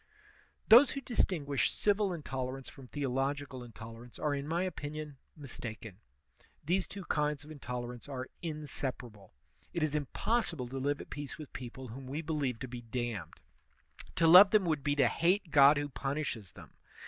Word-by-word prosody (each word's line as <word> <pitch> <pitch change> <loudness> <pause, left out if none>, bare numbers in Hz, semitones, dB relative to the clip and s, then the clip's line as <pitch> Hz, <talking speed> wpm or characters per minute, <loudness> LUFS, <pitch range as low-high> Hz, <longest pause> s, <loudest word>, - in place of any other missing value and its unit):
Those 245 +5 +9
who 275 - -3
distinguish 160 - +1
civil 205 -1 +2
intolerance 135 -5 -4
from 135 -2 -13
theological 135 -1 -2
intolerance 115 +1 -11
are 150 -1 0
in 140 0 -3
my 170 +3 0
opinion, 150 -4 -5 0.2
mistaken. 115 -7 -7 0.7
These 180 +4 +1
two 200 -1 -7
kinds 150 -1 0
of 150 - -12
intolerance 125 -3 -6
are 130 -2 -4
inseparable. 135 - -5 0.4
It 170 - +1
is 155 -2 0
impossible 150 - -1
to 135 +1 -4
live 145 +2 0
at - - -12
peace 145 0 -6
with 155 -3 -10
people 125 0 -7
whom 130 +3 -8
we 145 +5 -3
believe 145 -6 -1
to 130 - -3
be 120 -1 -7
damned; 120 -3 -4 0.7
to 170 - +3
love 180 +5 +10
them 210 -2 +4
would 155 -4 0
be 145 -1 +1
to 135 -4 +4
hate 175 - +1
God 140 0 +7
who 145 0 -1
punishes 135 - -3
them. - - -13
145 Hz, 160 wpm, -32 LUFS, 125-155 Hz, 0.7 s, love